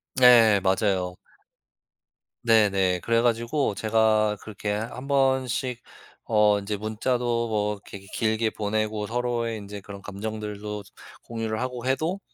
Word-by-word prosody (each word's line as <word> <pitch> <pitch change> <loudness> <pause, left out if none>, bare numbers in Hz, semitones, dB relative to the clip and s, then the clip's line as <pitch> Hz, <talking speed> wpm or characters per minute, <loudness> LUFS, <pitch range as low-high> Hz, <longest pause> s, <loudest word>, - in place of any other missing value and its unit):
네. 115 -5 +7
맞아요. 95 -2 +1 1.3
네네. 100 -5 +3
그래 115 0 +2
가지고 120 +1 0
제가 110 -1 +2
그렇게 105 -1 -5
한 115 +5 -4
번씩 130 -2 +1 0.4
어 105 -2 +3
인제 100 +1 -3
문자도 115 +2 -1
뭐 105 -1 0
이렇게 100 0 -11
기 100 - -17
길게 110 +1 0
보내고 105 0 -2
서로의 120 -1 -1
인제 100 -1 -8
그런 100 0 -10
감정들도 105 0 -5 0.4
공유를 110 -1 -3
하고 125 -1 -4
해도 160 +9 0
110 Hz, 260 characters per minute, -25 LUFS, 105-120 Hz, 1.3 s, 네